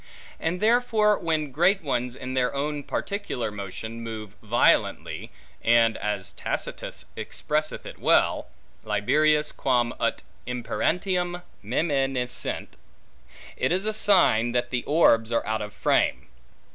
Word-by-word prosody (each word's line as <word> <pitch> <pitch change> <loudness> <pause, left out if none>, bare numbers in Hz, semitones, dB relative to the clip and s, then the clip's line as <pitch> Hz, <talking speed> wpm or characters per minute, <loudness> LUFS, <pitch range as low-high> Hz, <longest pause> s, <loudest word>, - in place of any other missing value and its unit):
And 170 +3 -1
therefore, 220 -1 +3
when 155 -3 -1
great 175 +7 +3
ones 125 -3 -1
in 130 -1 -6
their 130 +1 0
own 145 +1 -2
particular 200 - -3
motion, 105 +3 -6
move 110 -3 -7
violently, 115 +2 +1 0.3
and, 115 -1 +4
as 105 -2 -3
Tacitus - - -5
expresseth 155 +1 -3
it - - -9
well, - - +3 0.4
liberius 150 +7 +2
quam 120 -3 +1
ut - - -1 0.2
imperantium 175 +8 -1 0.2
meminissent; 135 +1 -1 0.8
it - - 0
is 185 +3 +1
a 215 - 0
sign 180 - +4
the 120 0 -1
orbs 115 -7 +4
are 115 - +1
out 110 0 -1
of 105 0 -5
frame. 105 - +1
130 Hz, 120 wpm, -26 LUFS, 115-170 Hz, 0.8 s, and